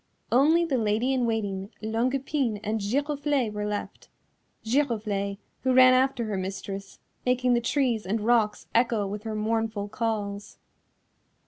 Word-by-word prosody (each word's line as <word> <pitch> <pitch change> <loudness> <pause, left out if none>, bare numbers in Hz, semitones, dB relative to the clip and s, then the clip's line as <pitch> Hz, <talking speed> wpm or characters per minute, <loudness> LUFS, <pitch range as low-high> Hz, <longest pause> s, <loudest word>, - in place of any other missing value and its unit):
Only 315 +7 +4
the 270 -6 0
Lady 225 +4 +1
in 250 -2 +1
Waiting, 200 -4 -2
Longue 225 +4 0
Epine 270 -5 -1
and 220 +1 -1
Giroflée 280 +1 0
were 210 0 -3
left, 210 0 -5 0.6
Giroflée, 215 -6 0 0.2
who 260 0 +2
ran 255 0 +8
after 260 -1 +2
her 210 -2 -2
mistress, 195 +1 -5 0.3
making 250 0 +2
the 240 - +2
trees 235 -5 0
and 215 +4 0
rocks 220 -1 +2
echo 230 -3 +2
with 200 +1 -5
her 220 -1 -3
mournful 220 -1 -1
calls. 210 -2 -3
225 Hz, 140 wpm, -27 LUFS, 210-255 Hz, 0.6 s, ran